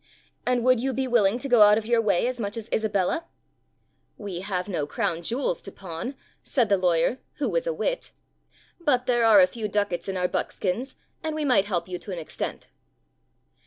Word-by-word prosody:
" - - -39
And 250 -1 +2
would 255 -1 +4
you 265 +2 -1
be 265 +1 -1
willing 230 -3 +3
to 275 - -5
go 245 -4 +5
out 210 0 +8
of 220 - -2
your 235 0 +3
way 210 -3 +2
as 250 0 -2
much 205 0 -3
as 225 -1 -6
Isabella?" 220 - 0 0.9
"We 200 -5 -5
have 185 -1 -3
no 160 -7 -2
crown 165 +2 -1
jewels 230 - -1
to 195 - -9
pawn," 190 +9 -6 0.3
said 240 -6 +1
the 200 - +4
lawyer, 180 +6 +2 0.2
who - - -1
was - - -1
a - - +2
wit, - - -2 0.7
"but 270 -7 +1
there 240 -2 +2
are 215 -3 +8
a - - +8
few 215 +4 -5
ducats 205 -3 -1
in 190 - -2
our 180 0 +1
buckskins 220 +9 -2 0.3
and 315 -1 -3
we 310 -1 -1
might 245 -8 +4
help 180 -4 -2
you 180 -1 -5
to 200 - -9
an 180 - -4
extent." 160 - -5
215 Hz, 205 wpm, -26 LUFS, 185-250 Hz, 0.9 s, out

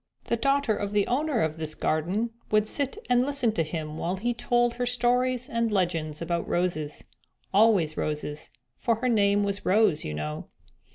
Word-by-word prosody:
The - - 0
daughter 275 -2 +1
of 205 0 -4
the 205 -1 +3
owner 280 -1 0
of 160 0 -2
this 155 -1 -2
garden 185 +9 -1 0.2
would 215 0 +2
sit 280 - -1
and 245 0 +3
listen 275 -4 +1
to 190 - -1
him 155 -1 -4
while 175 +2 -1
he 235 +6 -1
told 240 0 +1
her 245 +1 -2
stories 250 +1 +2
and 230 -1 -1
legends 170 -5 -1
about 170 0 -2
roses; 165 -4 -1 0.5
always 195 -7 +4
roses, 150 0 -3 0.3
for 230 -2 0
her 250 +3 -1
name 205 -2 +3
was 200 0 -2
Rose, 200 -5 +3
you 75 - -4
know." 75 0 -5
205 Hz, 175 wpm, -27 LUFS, 160-240 Hz, 0.5 s, always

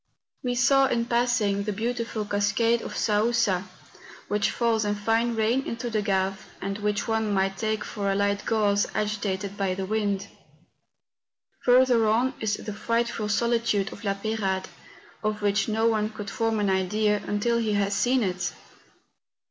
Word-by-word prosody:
We 245 -2 -1
saw, 270 +3 +4
in 235 -2 0
passing, 235 -4 +1
the 210 +1 -2
beautiful 230 0 -2
cascade 205 +3 +1
of - - -7
Saousa, 210 -3 +2 0.6
which 205 0 +1
hills 230 -2 +1
in 205 0 0
fine 225 +3 +1
rain 225 +4 +2
into 235 0 -4
the 215 -1 +1
Gave, 195 -1 -1
and 195 +2 -4
which 210 0 -1
one 220 -1 0
might 195 -1 +1
take 220 -1 -1
for 200 -1 -2
a - - 0
light 200 0 0
gauze 205 -2 +2
agitated 205 -2 -2
by 195 -2 0
the 190 0 -3
wind. 205 -1 -1 1.4
Further 245 -2 +5
on 235 +5 +2
is 210 -2 0
the 210 - -6
frightful 230 0 -1
solitude 230 -2 +1
of 205 - -12
La 200 -2 0
Peyrade, 200 -2 -2 0.5
of 215 0 -2
which 200 0 +2
no 220 +1 +1
one 215 -2 +2
could 205 -2 -7
form 225 -1 0
an 200 -2 +1
idea 210 +3 +1
until 235 +3 +1
he 220 -2 0
has 200 0 +1
seen 245 +5 +2
it. 180 -2 -2
215 Hz, 160 wpm, -26 LUFS, 200-230 Hz, 1.4 s, Further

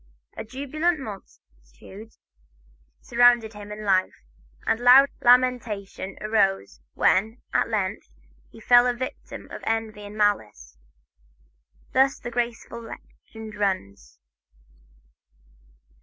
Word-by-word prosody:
A - - -6
jubilant 285 +8 -2
multitude 195 - -12 0.9
surrounded 240 -2 +3
him 210 0 -10
in 210 0 -7
life, 185 - 0 0.4
and 225 - +1
loud 255 +3 +7
lamentation 240 -6 +1
arose, 195 - 0
when, 220 +6 +2
at - - +1
length, 205 -3 -2 0.4
he - - -15
fell 245 0 +5
a 245 - 0
victim 255 +2 -7
to - - -8
envy 225 -2 -3
and 205 +1 -10
malice. 110 - -1 1.2
Thus 270 +1 +3
the 240 - -8
graceful 235 -1 -4
legend 220 -1 -12
runs. 145 - -3
220 Hz, 100 wpm, -24 LUFS, 195-245 Hz, 1.2 s, loud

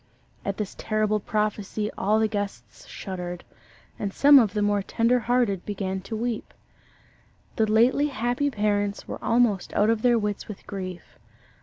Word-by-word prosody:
At 200 -1 -3
this 210 -3 -4
terrible 215 -1 0
prophecy 210 0 -2
all 210 +3 +2
the 220 - +3
guests 195 - -6
shuddered; 180 -2 -6 0.6
and 200 - -2
some 285 +6 +7
of 215 -5 +2
the 210 - +1
more 205 0 +2
tender 230 +5 +2
hearted 230 -5 +1
began 190 -2 -3
to 220 +4 -6
weep. 235 0 -4 1.0
The 220 -1 +1
lately 245 +6 +4
happy 245 +1 -1
parents 205 -3 -1
were - - -7
almost 230 -6 +1
out 210 +2 +4
of 225 -1 0
their 240 -1 +4
wits 210 -2 -2
with 210 -2 -9
grief. 185 -3 -7
210 Hz, 155 wpm, -25 LUFS, 200-230 Hz, 1.0 s, some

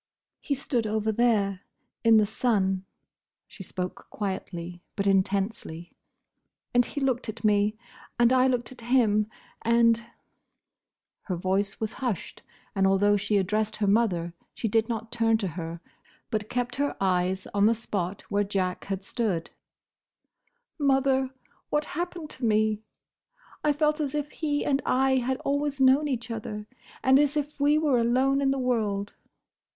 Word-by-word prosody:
"He 280 - -1
stood 245 -4 -1
over 220 0 0
there, 210 -4 +2 0.4
in 225 -1 +7
the 215 - +5
sun"—she 195 -2 -3
spoke 180 -1 -5
quietly 180 -4 -5
but 200 - -1
intensely—"and 195 +3 -2
he 285 - -5
looked 260 -4 0
at 220 - -7
me, 210 0 +3 0.4
and 240 +1 +5
I 255 0 +5
looked 250 -1 -1
at 255 - -12
him; 225 -4 +2 0.3
and—" 230 0 +4 1.2
her 185 - -2
voice 190 +3 -1
was 220 -1 -2
hushed, 245 -9 -4 0.3
and 195 -1 +3
although 205 +2 +4
she 205 +1 +1
addressed 210 +3 0
her 210 - -1
mother 195 -5 +2 0.2
she 225 - -2
did 225 +2 +1
not 225 0 -4
turn 225 -1 +3
to 200 -4 -2
her, 165 0 -6 0.5
but 215 -1 -2
kept 245 0 -2
her 285 +1 -1
eyes 185 0 +1
on 200 +1 +4
the 230 - +3
spot 200 -4 -3
where 205 0 0
Jack 190 -2 -2
had 195 -1 -3
stood—"Mother! 265 - -3 0.4
what 295 0 +1
happened 345 -1 -4
to 260 - -8
me? 215 -1 +2 0.8
I 300 - +4
felt 300 +1 +1
as 290 -2 -2
if 295 0 -2
he 295 -2 -1
and 275 -1 +2
I 265 +1 +3
had 260 +1 0
always 285 0 -1
known 265 +3 +5
each 240 -4 -3
other, 210 -1 -5 0.4
and 265 +1 +6
as 295 +1 +2
if 295 0 -3
we 290 +2 +4
were 295 -5 +3
alone 260 +4 +2
in 275 - +2
the 270 - +1
world. 215 -6 -1
225 Hz, 145 wpm, -27 LUFS, 200-265 Hz, 1.2 s, in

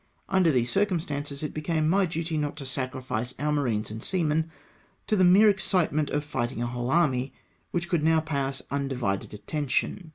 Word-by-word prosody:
Under 190 -3 +3
these 120 -3 +1
circumstances 155 -8 -1
it 150 - -3
became 155 0 0
my 190 +3 +3
duty 165 0 -3
not 150 -1 -2
to 140 - -6
sacrifice 130 -2 -3
our 150 +2 0
marines 120 -8 0
and 110 +1 -6
seamen 160 -2 0 0.6
to 215 - +1
the 190 - +4
mere 190 +4 +7
excitement 180 -7 +2
of 145 0 -1
fighting 120 -6 -3
a 120 - 0
whole 120 +1 -3
army 135 -5 +2 0.3
which 175 0 -2
could 170 -3 +1
now 160 +1 +4
pay 155 -3 -2
us 135 0 -3
undivided 130 -8 -2
attention. 150 - -2
150 Hz, 175 wpm, -27 LUFS, 130-165 Hz, 0.6 s, mere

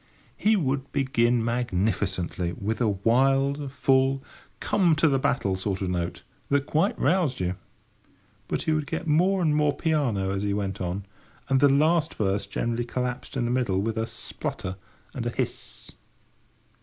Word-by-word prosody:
He 220 +1 +3
would 140 -6 -1
begin 120 -4 +2
magnificently 95 -6 -1
with 110 +6 -3
a 115 - +3
wild, 135 +7 +2
full, 135 0 +2 0.4
come 175 -5 +3
to 155 +1 +3
the 135 -3 +2
battle 100 -7 +1
sort 95 0 -2
of 95 - -2
a - - -1
note, 85 -1 -3 0.3
that 140 0 +2
quite 165 +9 +1
roused 155 -3 +1
you. 90 0 0 0.9
But - - -2
he 160 - 0
would 155 -2 0
get - - -3
more 180 +5 +3
and 155 -2 +2
more 150 -1 +2
piano 130 - 0
as 100 0 -2
he 100 -1 0
went 100 -2 -3
on, 90 +2 -3 0.4
and 135 -1 +4
the 145 +1 +6
last 155 +3 +3
verse 100 -1 0
generally 115 +4 -1
collapsed 125 +2 -4
in 120 - 0
the 120 - 0
middle 125 -7 +1
with 110 +2 -1
a 110 0 -1
splutter 90 -4 -5 0.4
and - - -3
a - - +1
hiss. - - -4
125 Hz, 170 wpm, -26 LUFS, 100-145 Hz, 0.9 s, the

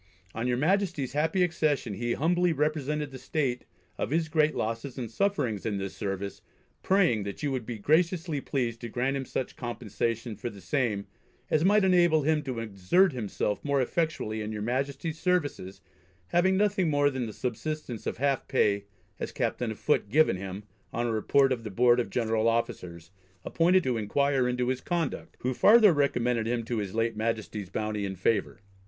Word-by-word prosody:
On 115 +2 -2
your 125 -1 +1
Majesty's 175 -3 0
happy 160 +5 +2
accession 155 -9 0
he 120 +4 -1
humbly 175 +4 +2
represented 150 0 -1
the 130 - -8
state 130 -5 -2 0.3
of - - -1
his 160 +2 0
great 155 -1 +2
losses 115 +4 -3
and 120 -4 -5
sufferings 135 - 0
in 105 -3 -1
this 95 -1 -5
service, 100 0 -4 0.4
praying, 180 - +3
that 100 +7 -6
you 145 - 0
would 130 -4 -3
be 120 -2 -4
graciously 160 - +1
pleased 120 -5 -2
to 120 - -5
grant 130 +4 -1
him 135 -1 -3
such 130 - -4
compensation 115 -1 -3
for 120 +4 -5
the 100 - -12
same 110 -4 -1 0.5
as 155 - +3
might 205 +2 +4
enable 175 -5 +4
him 155 +1 +2
to 130 -4 -5
exert 115 - +2
himself 105 -3 -2
more 140 -1 +1
effectually 130 -6 -1
in 105 0 -4
your 105 -1 -4
Majesty's 140 +6 -2
services 145 - -1 0.5
having 185 +2 +3
nothing 200 -4 +2
more 145 -1 +3
than 130 -3 -3
the - - -6
subsistence 125 +1 -4
of - - -3
half 140 +1 0
pay 100 -6 +2 0.3
as - - -4
Captain 120 - -1
of 110 - -5
Foot, 100 - +1
given 150 -4 +4
him, 95 +2 -6 0.3
on 120 +1 -1
a 120 - 0
report 135 +5 +3
of 120 -3 -1
the 110 - -5
Board 120 +4 +4
of 120 - -1
General 115 -2 +1
Officers 90 -7 -2 0.3
appointed 180 +2 +3
to 125 -3 0
inquire 130 +4 +1
into 125 0 0
his 130 -1 -1
conduct; 170 -4 -3
who 130 +1 0
farther 210 - +7
recommended 125 -5 +1
him 120 0 -1
to 115 0 -2
his 100 -1 -4
late 115 0 0
Majesty's 110 -3 -3
bounty 105 +1 -2
and 95 -1 -4
favour. 100 0 0
125 Hz, 185 wpm, -28 LUFS, 110-155 Hz, 0.5 s, farther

